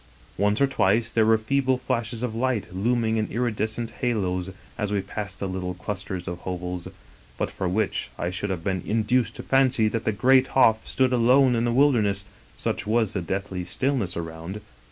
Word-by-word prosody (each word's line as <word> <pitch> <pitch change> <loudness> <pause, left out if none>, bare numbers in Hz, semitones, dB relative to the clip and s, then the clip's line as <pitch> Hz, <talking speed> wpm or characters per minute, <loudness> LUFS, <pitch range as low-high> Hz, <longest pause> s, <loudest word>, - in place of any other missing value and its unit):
Once 105 +2 +1
or 140 - +5
twice 115 -3 +1
there 110 -1 +3
were 110 0 +5
feeble 130 +3 +1
flashes 120 -2 -3
of 120 -3 -2
light 115 -4 -1
looming 115 +3 +1
in 110 - 0
iridescent 115 -1 -2
halos 95 -7 0 0.3
as 105 -3 -2
we 100 - +1
passed 100 0 -6
little 95 -1 -3
clusters 95 -1 -5
of 90 -1 -4
hovels, 90 -1 -4 0.5
but - - -2
for 95 -2 -2
which 105 +3 -1
I 85 - -2
should 100 +3 -3
have 90 -3 -3
been 95 -1 -1
induced 115 +1 +1
to - - -7
fancy 130 -4 +3
that 115 +1 -2
the - - +1
great 130 +5 +4
Hof 110 -4 +4
stood 130 -1 +1
alone 125 +2 +5
in 115 +1 +1
the 120 - +1
wilderness, 115 -7 +3 0.3
such - - -3
was 110 -2 +2
the 95 - -1
deathly 95 +1 -3
stillness 120 -3 -1
around. 85 +4 -6
110 Hz, 180 wpm, -25 LUFS, 95-120 Hz, 0.5 s, or